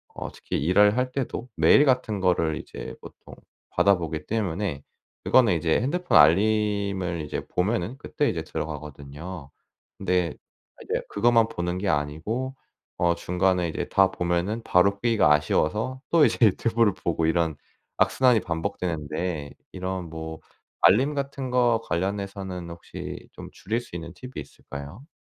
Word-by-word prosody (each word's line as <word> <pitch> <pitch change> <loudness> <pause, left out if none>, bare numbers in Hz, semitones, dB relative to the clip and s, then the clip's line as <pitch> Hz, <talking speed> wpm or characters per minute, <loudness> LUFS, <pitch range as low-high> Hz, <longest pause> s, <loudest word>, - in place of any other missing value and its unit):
어 - - -5
특히 - - -4
일을 105 +5 +5
할 125 0 0
때도 125 -2 -4
메일 145 - +6
같은 125 -6 +1
거를 85 -4 +1
이제 - - -8
보통 - - -13 0.4
받아보기 85 -5 +1
때문에 95 -8 -2 0.4
그거는 115 -8 +4
이제 80 0 +1
핸드폰 175 +8 +2
알림을 100 +1 +2
이제 75 - -4
보면은 105 +5 -1
그때 - - -1
이제 - - -3
들어가거든요. 75 +2 -7 0.5
근데 90 -3 0 0.5
이제 - - -2
그것만 115 +1 +3
보는 90 -2 -3
게 100 +1 -1
아니고 80 - -2 0.4
어 85 0 +2
중간에 90 0 +1
이제 - - -4
다 95 -1 +4
보면은 90 +6 -1
바로 100 0 +3
끄기가 115 -10 +4
아쉬워서 105 - 0
또 165 -3 +6
이제 115 - +1
유튜브를 110 +1 +2
보고 85 -3 -1
이런 80 -1 +1 0.4
악순환이 125 -3 +4
반복되는데, 80 -3 -3 0.2
이런 95 -1 -4
뭐 80 0 -6 0.4
알림 135 +8 +5
같은 140 -2 -3
거 120 -2 +3
관련해서는 95 -1 -3
혹시 85 0 -8
좀 - - -10
줄일 115 +4 -3
수 105 - -12
있는 85 0 -7
팁이 125 +6 -11
있을까요? 75 - -9
95 Hz, 310 characters per minute, -25 LUFS, 85-115 Hz, 0.5 s, 메일